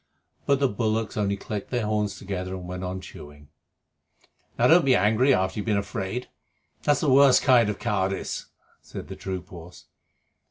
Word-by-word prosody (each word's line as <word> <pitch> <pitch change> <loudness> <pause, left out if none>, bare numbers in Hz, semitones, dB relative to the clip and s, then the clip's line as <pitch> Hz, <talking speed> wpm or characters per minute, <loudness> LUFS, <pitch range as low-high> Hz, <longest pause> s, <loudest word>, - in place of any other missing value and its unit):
But 140 -1 +3
the 140 - +3
bullocks 110 0 -2
only 100 -1 0
clicked 105 0 -6
their 120 -3 -1
horns 105 -1 -1
together 95 -1 -5
and 90 -1 -8
went 90 +1 -6
on 90 0 -4
chewing. 75 -4 -13 1.1
"Now, - - +3
don't 170 +1 +6
be 130 -2 +4
angry 110 +7 +3
after 95 -4 +1
you've 105 - -5
been 105 -2 +2
afraid. 100 +4 -4 0.5
That's 145 -2 +2
the 150 - +1
worst 135 0 +6
kind 120 -5 +5
of 105 - -3
cowardice," 95 -4 -2 0.3
said - - -9
the - - -6
troop 95 -2 -6
horse. 85 0 -12
105 Hz, 170 wpm, -25 LUFS, 95-120 Hz, 1.1 s, don't